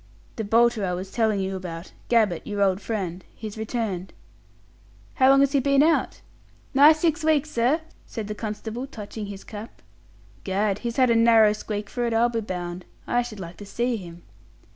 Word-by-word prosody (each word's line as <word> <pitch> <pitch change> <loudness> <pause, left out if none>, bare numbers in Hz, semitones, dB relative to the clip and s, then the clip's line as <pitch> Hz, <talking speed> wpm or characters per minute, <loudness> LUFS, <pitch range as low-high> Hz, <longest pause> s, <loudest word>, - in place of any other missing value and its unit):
"The 220 - -2
bolter 230 +1 +3
I 180 -2 0
was 185 +2 -5
telling 220 -4 +1
you 190 0 -2
about 175 -2 -7 0.2
Gabbett, 215 -8 +2
your 205 -1 0
old 190 0 +1
friend. 190 -5 -4
He's 215 -2 -7
returned." 220 -5 -3 1.0
"How 260 -1 +4
long 275 0 +6
has 280 -1 +3
he 280 - +3
been 275 +1 +4
out?" 325 +1 +1 0.5
"Nigh 285 +3 +8
six 315 0 0
weeks, 310 -1 +2
sir," 250 +8 +2 0.3
said 220 -3 -5
the 210 - -3
constable, 220 +4 -5
touching 210 -3 -7
his 200 -1 -8
cap. 215 +1 -10 0.6
"Gad, 200 +1 0
he's 235 -1 -4
had 255 -2 +4
a - - +4
narrow 225 -2 +6
squeak 210 -1 -5
for 245 - -3
it, 230 -1 0
I'll 235 +2 +4
be 230 -1 -2
bound. 180 -3 -5 0.2
I 245 - +1
should 235 -4 -7
like 170 -1 -8
to 205 - -9
see 240 +4 -1
him." 175 -3 -11
220 Hz, 185 wpm, -25 LUFS, 195-240 Hz, 1.0 s, Nigh